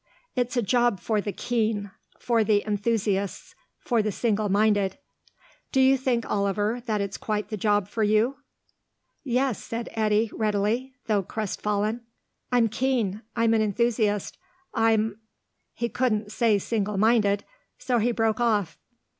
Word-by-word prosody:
It's 250 0 -1
a 240 - +2
job 240 -1 +2
for 215 -2 0
the 205 - -3
keen; 215 -3 -1 0.3
for 230 -2 +1
the 210 -1 +2
enthusiasts; 205 -2 -1 0.2
for 235 -3 +1
the 215 0 -1
single 215 0 0
minded. 205 0 +2 0.7
Do 265 - +2
you 265 +1 +6
think, 250 -3 -1
Oliver, 205 +4 0
that 210 -2 0
it's 200 -1 -4
quite 210 -1 -2
the 220 - -3
job 205 -1 +1
for 220 +2 -4
you?" 215 +5 +2 0.9
"Yes," 255 -3 0
said 230 0 -5
Eddy, 215 0 +1
readily, 220 +5 -1
though 210 -3 +2
crest 210 +2 -4
fallen. 210 +3 0 0.5
"I'm 245 -2 +4
keen. 225 -4 -1
I'm 230 -1 +3
an 220 - +3
enthusiast. 215 -1 0 0.3
I'm 225 -2 +2 0.2
" - - -51
He 235 - -1
couldn't 215 -4 -1
say 220 -2 +3
single 210 0 -2
minded, 205 -2 +3 0.3
so 250 -1 0
he 235 +3 +2
broke 225 -1 0
off. 215 -7 +1
220 Hz, 145 wpm, -26 LUFS, 205-235 Hz, 0.9 s, you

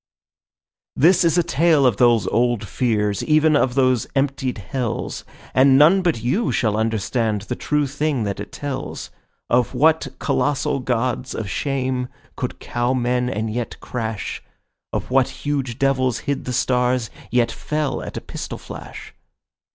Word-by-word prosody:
This 170 +7 +5
is 170 0 +3
a 175 - +4
tale 160 -3 +3
of 120 -5 +3
those 120 -1 +4
old 120 -2 +1
fears, 105 -5 0
even 155 0 +4
of 130 -3 +2
those 130 -4 +2
emptied 135 -2 0
hells, 120 +4 -4 0.3
And 135 +1 +6
none 165 +7 +6
but 165 -11 0
you 185 - +1
shall 110 -3 +1
understand 110 -1 0
the 125 - -4
true 150 +2 0
thing 145 -2 -1
that 100 -1 -3
it - - -7
tells— 140 -2 -5 0.4
Of 125 +1 +1
what 160 +5 +3
colossal 145 -1 0
gods 125 +1 -1
of 110 - -4
shame 130 +2 -1 0.3
could - - -4
cow 120 +2 -1
men 125 0 0
and 110 -1 -2
yet 120 0 -4
crash, 110 -4 -4 0.5
Of - - -4
what 130 -1 +3 0.2
huge 135 -5 -1
devils 130 -3 +1
hid 140 -1 -3
the 125 - -3
stars, 125 -2 +1 0.2
yet 120 -1 +2
fell 150 -3 -2
at - - -7
a - - -4
pistol - - -6
flash. - - -10
130 Hz, 150 wpm, -21 LUFS, 120-140 Hz, 0.5 s, And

